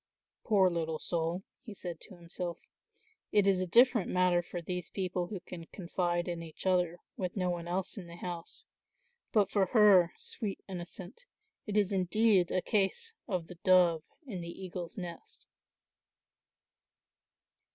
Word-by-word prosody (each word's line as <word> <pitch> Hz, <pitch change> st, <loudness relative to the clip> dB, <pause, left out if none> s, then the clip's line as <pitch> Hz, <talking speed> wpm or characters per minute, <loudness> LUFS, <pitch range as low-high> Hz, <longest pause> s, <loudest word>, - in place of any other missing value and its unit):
"Poor 200 Hz, -4 st, +4 dB
little 165 Hz, -2 st, -1 dB
soul," 170 Hz, +3 st, -1 dB, 0.2 s
he 215 Hz, -4 st, -9 dB
said 175 Hz, -4 st, -6 dB
to 195 Hz, -, -10 dB
himself, 175 Hz, 0 st, -5 dB, 0.7 s
"it 205 Hz, -2 st, +4 dB
is 195 Hz, -2 st, +3 dB
a 185 Hz, -, -1 dB
different 235 Hz, +2 st, +5 dB
matter 180 Hz, -1 st, +3 dB
for 175 Hz, +1 st, -6 dB
these 180 Hz, +1 st, -4 dB
people 180 Hz, -2 st, -2 dB
who 195 Hz, 0 st, -5 dB
can 170 Hz, -2 st, -9 dB
confide 175 Hz, -1 st, -1 dB
in 170 Hz, -1 st, -3 dB
each 165 Hz, +1 st, -9 dB
other, 180 Hz, -2 st, +2 dB, 0.2 s
with 185 Hz, +1 st, -3 dB
no 180 Hz, -2 st, +1 dB
one 170 Hz, -1 st, -4 dB
else 185 Hz, +3 st, -2 dB
in 180 Hz, -, -9 dB
the 170 Hz, -, -10 dB
house; 175 Hz, -1 st, -6 dB, 0.7 s
but 210 Hz, -3 st, +3 dB
for 195 Hz, -2 st, +3 dB
her, 200 Hz, -6 st, +7 dB
sweet 210 Hz, -5 st, -4 dB
innocent, 185 Hz, -, -8 dB, 0.4 s
it 210 Hz, 0 st, -1 dB
is 205 Hz, -2 st, +3 dB
indeed 195 Hz, 0 st, +3 dB
a 185 Hz, -, 0 dB
case 220 Hz, -, 0 dB
of 180 Hz, -7 st, -1 dB
the 175 Hz, 0 st, -12 dB
dove 180 Hz, -3 st, +5 dB, 0.2 s
in 200 Hz, -9 st, -5 dB
the 170 Hz, -, -6 dB
eagle's 180 Hz, 0 st, -7 dB
nest." 185 Hz, -, -8 dB
180 Hz, 150 wpm, -32 LUFS, 175-195 Hz, 0.7 s, her